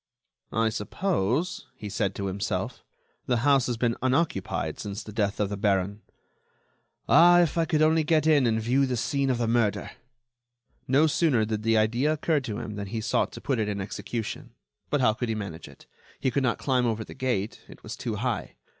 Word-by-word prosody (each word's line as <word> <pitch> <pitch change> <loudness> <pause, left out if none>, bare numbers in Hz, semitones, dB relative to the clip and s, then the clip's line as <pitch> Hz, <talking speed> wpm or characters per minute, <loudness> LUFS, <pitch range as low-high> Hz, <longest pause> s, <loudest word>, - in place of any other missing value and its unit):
"I 110 0 +3
suppose," 160 - -1
he 105 - -7
said 100 -1 -1
to 100 - -3
himself, 95 +1 -3 0.4
"the 125 - +2
house 140 -3 +4
has 120 -2 -2
been 115 0 +1
unoccupied 130 - 0
since 100 0 -5
the 110 - -9
death 105 -1 -1
of 105 -2 +1
the 100 - -4
baron.... 100 0 0 1.1
Ah! 175 +1 +7
if 170 -4 +1
I 165 -1 +2
could 155 -2 +2
only 160 0 +4
get 155 0 +2
in 145 -5 +4
and 110 -1 +1
view 130 +5 +2
the 125 -1 -1
scene 140 +3 0
of 125 - +1
the 120 -1 0
murder!" 115 -3 +1 1.0
No 140 +4 +4
sooner 145 -7 +2
did 105 -1 -2
the 115 0 +2
idea 120 +7 +2
occur 155 0 +1
to 110 -6 -5
him 105 -3 -6
than 100 -1 -4
he 110 +3 -3
sought 115 +3 0
to - - -9
put 135 -4 -1
it 105 -1 0
in 100 -1 -3
execution. 110 +3 -5 0.3
But 145 -1 +1
how 110 -4 +4
could 120 +2 -3
he 110 - 0
manage 95 -6 -6
it? - - -16 0.3
He 130 - 0
could 140 - +1
not 130 -3 +1
climb 125 -3 +1
over 110 -1 -1
the - - -11
gate; 120 -6 -2
it - - -14
was - - -6
too - - -4
high. - - -3
120 Hz, 205 wpm, -27 LUFS, 105-140 Hz, 1.1 s, Ah